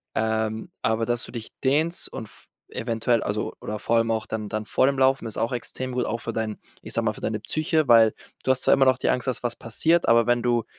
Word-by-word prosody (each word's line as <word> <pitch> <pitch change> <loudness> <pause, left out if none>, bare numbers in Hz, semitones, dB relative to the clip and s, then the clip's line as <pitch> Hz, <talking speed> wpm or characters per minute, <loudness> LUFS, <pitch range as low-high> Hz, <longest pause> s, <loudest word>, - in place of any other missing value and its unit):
Ähm, 110 0 -1
aber 110 +1 +1
dass 120 -2 0
du - - -9
dich 115 -2 -7
dehnst 155 +6 +1
und 115 - -6
v - - -18 0.2
eventuell 115 0 0
also 105 +1 -2
oder 105 0 -5
vor 115 - +1
allem 115 0 +2
auch 110 -1 -1
dann 110 -1 -4
dann 110 +1 -3
vor 130 - +2
dem 135 0 +1
Laufen 135 -1 +3
ist 110 - -7
auch 115 - 0
extrem 130 +1 -4
gut, 125 0 -1
auch 115 - -3
für 115 - -4
dein 110 -1 -3 0.2
ich - - -9
sage 115 - 0
mal, 110 - +1
für - - -12
deine 110 -1 -2
Psyche, 155 +7 0
weil 115 -2 +7 0.3
du 130 - +3
hast 130 0 +1
zwar - - +5
immer 135 - +4
noch 130 -1 +4
die - - 0
Angst, 125 0 0
dass 125 -1 -2
was 120 - -2
passiert, 165 +9 +1
aber 115 0 +5
wenn 120 0 +2
du, 120 -1 +1
115 Hz, 255 wpm, -25 LUFS, 110-130 Hz, 0.3 s, weil